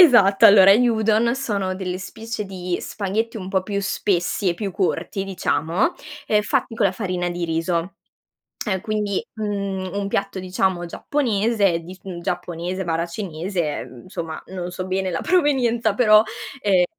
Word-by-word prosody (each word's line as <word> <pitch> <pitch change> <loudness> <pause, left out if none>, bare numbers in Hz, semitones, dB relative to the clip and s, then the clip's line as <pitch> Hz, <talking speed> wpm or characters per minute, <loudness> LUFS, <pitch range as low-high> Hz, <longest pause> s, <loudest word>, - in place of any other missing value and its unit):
Esatto, 220 - +7
allora 195 -1 +8
gli 245 +4 +4
udon 225 +1 +2
sono 200 -8 -2
delle 185 -1 -4
specie 225 +2 -5
di 180 -2 -3
spaghetti 220 +3 -2
un 185 -3 -6
po' 190 -2 +1
più 200 +1 -3
spessi 190 0 0
e 170 - +1
più 200 +1 -3
corti 195 0 -1
diciamo, 190 - 0 0.4
ehm, 210 -1 +4
fatti 245 +1 -1
con 215 -3 +3
la 190 - 0
farina 180 -3 -2
di 175 0 -3
riso, 170 +3 -1 0.7
ehm, 190 -3 0
quindi, 210 -1 -1
mhmm, 200 -3 -3
un 200 0 -1
piatto 200 -1 -2
diciamo 185 -1 0
giapponese 210 -4 +1
di 170 +2 -10
s 190 - -20 0.2
giapponese/cinese, 175 -1 -3
ehm, 125 - -10
insomma, 170 -4 -6
non 180 -1 -5
so 185 +1 -5
bene 190 0 -1
la 165 - -2
provenienza 250 - +2
però, 215 -2 +6 0.4
ehm 190 -3 +4
195 Hz, 150 wpm, -22 LUFS, 180-215 Hz, 0.7 s, allora